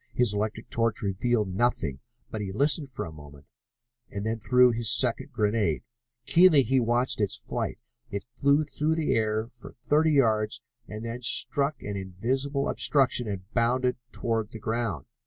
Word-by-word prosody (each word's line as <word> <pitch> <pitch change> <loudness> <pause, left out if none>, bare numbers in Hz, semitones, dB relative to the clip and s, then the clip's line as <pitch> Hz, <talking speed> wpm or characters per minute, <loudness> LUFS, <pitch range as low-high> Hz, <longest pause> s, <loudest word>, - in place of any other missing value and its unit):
His 120 -4 +3
electric 110 +2 -3
torch 115 -2 0
revealed 100 +1 0
nothing, 115 - 0 0.3
but 110 - -4
he 100 -2 -4
listened 140 - +1
for 130 - -5
a 80 - -8
moment, 75 -2 -14 0.6
and 100 +1 -5
then 110 +1 -2
threw 125 +4 +4
his 115 -3 +1
second - - +2
grenade. 105 - 0 0.4
Keenly 165 -5 +6
he 130 +3 +2
watched 120 0 +1
its 100 - 0
flight. - - -4 0.3
It 100 -3 -5
flew 140 +4 +3
through 150 +2 -1
the 160 -2 0
air 110 0 0
for 120 - -13
thirty 155 +1 +3
yards 110 -6 +1 0.2
and 110 +1 -7
then 115 +2 -5
struck 140 +4 +2
an 105 -1 -4
invisible 130 +10 -2
obstruction 130 -4 +2
and 100 -3 -4
bounded 125 +2 +1 0.2
toward 115 -2 -2
the 115 - -8
ground. 115 -1 -2
115 Hz, 160 wpm, -27 LUFS, 105-130 Hz, 0.6 s, Keenly